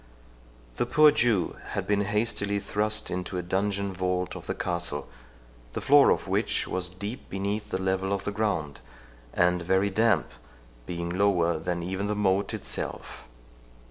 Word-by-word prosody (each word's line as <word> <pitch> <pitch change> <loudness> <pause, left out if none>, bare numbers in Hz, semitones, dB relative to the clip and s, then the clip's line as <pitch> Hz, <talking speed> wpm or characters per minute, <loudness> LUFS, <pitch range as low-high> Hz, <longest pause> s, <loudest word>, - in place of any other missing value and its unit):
The - - 0
poor 150 +4 +7
Jew 110 -10 +1 0.2
had - - -2
been 100 -1 +1
hastily 105 -1 0
thrust 105 +1 -1
into 90 +1 -3
a 90 - -2
dungeon 100 +2 -1
vault 90 0 -1
of - - -9
the - - -2
castle, 85 -6 -3 0.7
the - - -2
floor 145 0 +6
of - - +1
which - - 0
was 90 -1 -2
deep 100 +7 -7
beneath 100 +2 -3
the - - -1
level 95 +1 -1
of 100 -1 -1
the 105 - -2
ground, 100 -9 -1 0.5
and 90 0 +2
very 95 +3 +2
damp, 110 -4 +2 0.6
being 85 -1 -3
lower 90 -4 +2
than 85 +1 -2
even 95 +3 -2
the 105 - -1
moat 100 -1 +1
itself. - - -5
95 Hz, 155 wpm, -27 LUFS, 90-105 Hz, 0.7 s, poor